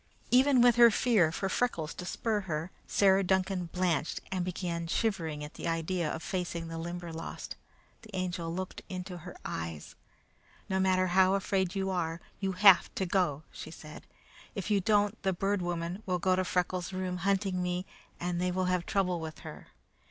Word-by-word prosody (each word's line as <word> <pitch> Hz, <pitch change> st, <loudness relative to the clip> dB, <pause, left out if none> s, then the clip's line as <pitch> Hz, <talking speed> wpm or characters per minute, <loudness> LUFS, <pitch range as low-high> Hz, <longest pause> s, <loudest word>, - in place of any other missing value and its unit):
Even 260 Hz, 0 st, +6 dB
with 240 Hz, -1 st, +6 dB
her 235 Hz, -1 st, +9 dB
fear 210 Hz, -7 st, +3 dB
for 195 Hz, +4 st, -2 dB
Freckles 175 Hz, -7 st, -1 dB
to 180 Hz, -, -7 dB
spur 220 Hz, +2 st, 0 dB
her, 165 Hz, -2 st, -4 dB, 0.2 s
Sarah 195 Hz, -1 st, +4 dB
Duncan 190 Hz, -1 st, +1 dB
blanched 170 Hz, -3 st, 0 dB
and 185 Hz, -2 st, 0 dB
began 175 Hz, -2 st, -3 dB
shivering 165 Hz, -7 st, -1 dB
at 150 Hz, -, -8 dB
the -, -, -5 dB
idea 165 Hz, 0 st, -1 dB
of 160 Hz, -, -5 dB
facing 175 Hz, -3 st, -3 dB
the 165 Hz, 0 st, -5 dB
Limberlost. 170 Hz, -1 st, -6 dB, 0.5 s
The 220 Hz, -, -15 dB
Angel 175 Hz, -2 st, -2 dB
looked 185 Hz, +2 st, -4 dB
her -, -, -18 dB
in 185 Hz, -1 st, -4 dB
the 175 Hz, -1 st, -8 dB
eyes. 80 Hz, -2 st, -5 dB, 0.7 s
"No 190 Hz, 0 st, 0 dB
matter 185 Hz, -1 st, +3 dB
how 185 Hz, +1 st, +4 dB
afraid 190 Hz, -1 st, 0 dB
you 190 Hz, -1 st, 0 dB
are, 165 Hz, -2 st, -1 dB, 0.2 s
you 195 Hz, -1 st, -1 dB
have 195 Hz, 0 st, +7 dB
to 190 Hz, -, 0 dB
go," 175 Hz, -5 st, +1 dB
she -, -, -8 dB
said. 155 Hz, -1 st, -11 dB, 0.5 s
"If 200 Hz, +1 st, -3 dB
you 200 Hz, -1 st, +3 dB
don't 205 Hz, +2 st, +2 dB
the 190 Hz, -, +1 dB
Bird 195 Hz, +2 st, 0 dB
Woman 175 Hz, +2 st, -3 dB
will 180 Hz, -1 st, +1 dB
go 185 Hz, +1 st, +2 dB
to 185 Hz, -, +1 dB
Freckles' 180 Hz, 0 st, -1 dB
room, 185 Hz, -1 st, -2 dB
hunting 190 Hz, 0 st, 0 dB
me, 180 Hz, +1 st, -1 dB, 0.3 s
and 175 Hz, 0 st, -2 dB
they 180 Hz, -, +1 dB
will 185 Hz, +1 st, 0 dB
have 180 Hz, -1 st, 0 dB
trouble 180 Hz, -3 st, +1 dB
with 160 Hz, -1 st, -7 dB
her. -, -, -9 dB
180 Hz, 180 wpm, -31 LUFS, 170-195 Hz, 0.7 s, her